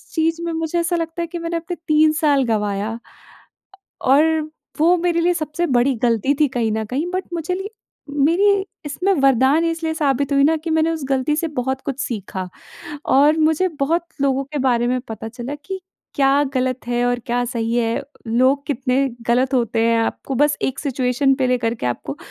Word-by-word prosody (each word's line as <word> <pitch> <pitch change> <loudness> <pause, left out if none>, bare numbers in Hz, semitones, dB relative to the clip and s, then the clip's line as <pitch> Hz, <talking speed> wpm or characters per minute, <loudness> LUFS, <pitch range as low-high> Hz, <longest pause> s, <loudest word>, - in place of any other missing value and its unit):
चीज़ 325 0 +1
में 340 - -2
मुझे 325 +1 -1
ऐसा 340 +1 0
लगता 330 +1 -3
है 335 - -2
कि 340 +1 -6
मैंने 335 0 -2
अपने 345 +2 -5
3 310 0 +5
साल 285 -3 +3
गँवाया। 210 -2 -1
अ, 230 - -7 1.0
और 275 +3 +5 0.6
वो 335 +3 +5
मेरे 340 -1 +1
लिए 355 +1 +3
सबसे 315 +1 -2
बड़ी 260 +2 +2
गलती 235 +3 +2
थी 300 - +5
कहीं 225 -2 +1
न 220 0 -2
कहीं। 270 +10 -2
बट 370 +1 -1
मुझे 335 +1 -2
ली 385 +2 -5 0.4
मेरी 330 +8 +3 0.3
इसमें 360 +7 0
वरदान 270 +4 +4
इसलिए 330 -1 -1
साबित 280 -2 0
हुई 275 0 +4
ना 320 +3 +4
कि 335 - -3
मैंने 320 +1 +2
उस 320 -3 -4
गलती 270 +2 +1
से 330 - 0
बहुत 265 +1 -2
कुछ 275 0 -4
सीखा। 190 -6 -4 0.6
और 295 +4 +4
मुझे 320 +4 +2
बहुत 330 +5 +1 0.2
लोगों 275 0 +1
के 290 +2 -5
बारे 240 -1 +2
में 255 0 0
पता 220 0 -6
चला 240 +4 -6
कि 385 -1 -4 0.3
क्या 275 +1 +3
गलत 255 -1 -1
है 240 0 +1
और 245 0 +1
क्या 245 +1 0
सही 230 -1 -2
है, 230 -1 0 0.3
लोग 260 +5 +2
कितने 255 -2 -1 0.3
गलत 255 +3 +2
होते 230 -2 +1
हैं 230 0 +3
आपको 245 +4 -3
बस 295 0 +3
एक 265 - -1
सिचुएशन 270 -1 +1
पे 260 -1 0
लेकर 240 -2 +1
के 220 - -4
आपको 130 +3 -3
275 Hz, 195 wpm, -20 LUFS, 245-320 Hz, 1.0 s, 3